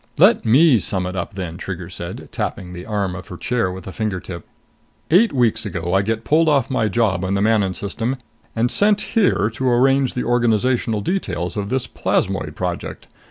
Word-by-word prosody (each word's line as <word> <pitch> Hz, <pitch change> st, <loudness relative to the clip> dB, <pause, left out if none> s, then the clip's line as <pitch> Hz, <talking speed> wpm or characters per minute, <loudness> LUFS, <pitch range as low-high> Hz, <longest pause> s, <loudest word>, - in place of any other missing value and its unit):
"Let -, -, +5 dB
me 130 Hz, +2 st, +5 dB
sum 95 Hz, -1 st, +1 dB
it 90 Hz, +1 st, -4 dB
up 95 Hz, +3 st, -4 dB
then," 90 Hz, -3 st, -5 dB
Trigger 90 Hz, -2 st, -6 dB
said, 85 Hz, -1 st, -7 dB
tapping 90 Hz, -1 st, -4 dB
the 90 Hz, 0 st, -8 dB
arm 100 Hz, -4 st, -1 dB
of 95 Hz, -, -9 dB
her 90 Hz, -, -8 dB
chair 115 Hz, -5 st, -1 dB
with 90 Hz, -1 st, -8 dB
a 95 Hz, -, -6 dB
finger 105 Hz, -2 st, -2 dB
tip. 85 Hz, -2 st, -9 dB, 0.6 s
"Eight 210 Hz, +7 st, +5 dB
weeks 120 Hz, -5 st, +1 dB
ago 85 Hz, -1 st, -3 dB
I 95 Hz, -, +4 dB
get 110 Hz, +2 st, -2 dB
pulled 155 Hz, +6 st, +3 dB
off 140 Hz, -4 st, +2 dB
my 120 Hz, -4 st, +1 dB
job 100 Hz, -4 st, +1 dB
in 95 Hz, +1 st, 0 dB
the -, -, +1 dB
Manon 105 Hz, -4 st, +2 dB
System 115 Hz, +5 st, -3 dB, 0.4 s
and 115 Hz, +2 st, +1 dB
sent 205 Hz, 0 st, +3 dB
here 200 Hz, -, +3 dB
to 130 Hz, +3 st, 0 dB
arrange 135 Hz, +2 st, +3 dB
the 125 Hz, -, -1 dB
organizational 120 Hz, -1 st, +1 dB
details 90 Hz, -, -2 dB
of 100 Hz, -1 st, -3 dB
this 130 Hz, -1 st, -1 dB
Plasmoid -, -, -1 dB
Project. -, -, -5 dB
110 Hz, 195 wpm, -20 LUFS, 95-125 Hz, 0.6 s, Let